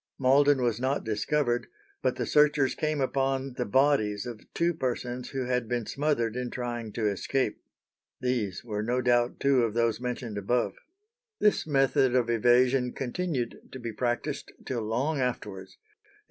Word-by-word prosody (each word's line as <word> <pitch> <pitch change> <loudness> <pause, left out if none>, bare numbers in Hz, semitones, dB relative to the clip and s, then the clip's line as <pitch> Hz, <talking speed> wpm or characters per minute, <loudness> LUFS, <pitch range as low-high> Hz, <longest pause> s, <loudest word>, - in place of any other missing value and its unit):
Malden 140 +1 +4
was 120 -2 +1
not 130 +3 0
discovered, 120 +3 0 0.3
but - - +1
the - - -2
searchers 150 -3 +3
came 155 -1 -1
upon 135 0 0
"the 125 -2 -3
bodies 110 -4 +2
of 120 -3 -9
two 170 +1 +2
persons 125 -3 -3
who 135 -2 -3
had 125 -2 0
been 120 -1 -1
smothered 135 -6 0
in 125 -1 -2
trying 120 -3 -4
to 110 -2 0
escape." 105 +4 -1 0.6
These 120 -7 -1
were 105 -3 -3
no 120 +4 0
doubt 120 0 +2
two 140 -2 +3
of 115 -1 -1
those 115 -1 +1
mentioned 120 -4 -3
above. 120 +5 0 0.7
This 210 -6 +2
method 135 -2 +3
of 120 -2 +2
evasion 125 +2 +3
continued 135 -2 -3
to - - -7
be 115 -2 -5
practised 125 +5 -2
till 120 -3 -2
long 130 +8 -1
afterwards. 105 -7 -4
125 Hz, 155 wpm, -28 LUFS, 115-135 Hz, 0.7 s, Malden